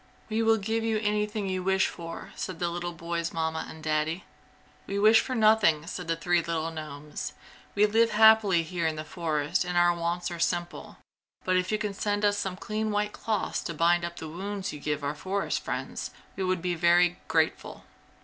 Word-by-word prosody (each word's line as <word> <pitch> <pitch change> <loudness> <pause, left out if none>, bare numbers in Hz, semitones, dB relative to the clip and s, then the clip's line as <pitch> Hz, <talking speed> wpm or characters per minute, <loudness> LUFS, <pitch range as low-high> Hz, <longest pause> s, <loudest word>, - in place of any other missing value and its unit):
"We 220 +1 0
will 225 0 +4
give 220 +2 -1
you 225 -1 +1
anything 210 -1 -1
you 185 -1 -1
wish 190 +1 +2
for!" 165 -1 -7
said 185 -3 -5
the 175 +1 -1
little 175 0 -3
boy's 170 0 -3
Mamma 160 0 -2
and 160 0 -11
Daddy. 155 +3 0 0.6
"We 200 - -2
wish 215 +2 +6
for 260 - -4
nothing!" 215 -9 +4
said 180 0 -6
the 165 - +1
three 175 +1 +2
little 165 -1 -2
gnomes, 150 -2 -6 0.4
"We 205 +1 +5
live 225 +2 +3
happily 220 -5 +6
here 170 0 -2
in 160 - -1
the 155 - -5
forest 155 -2 -1
and 180 0 -2
our 175 0 +5
wants 170 +1 -2
are 170 - -6
simple, 175 0 -2 0.5
but 185 - +2
if 185 +1 +1
you 215 - +2
could 210 -2 -3
send 205 +1 0
us 205 0 +3
some 190 -2 -3
clean 215 +2 -2
white 210 0 0
cloths 215 -4 -2
to 170 - -5
bind 170 +2 +3
up 170 0 -4
the 160 - -6
wounds 195 +4 -4
you 150 - -7
give 150 0 -2
our 140 +1 -1
forest 190 +6 -2
friends - - -4 0.3
we 190 - -2
would 185 -2 0
be 180 -1 0
very 175 +1 +3
grateful!" 160 -1 0
180 Hz, 200 wpm, -28 LUFS, 165-205 Hz, 0.6 s, wish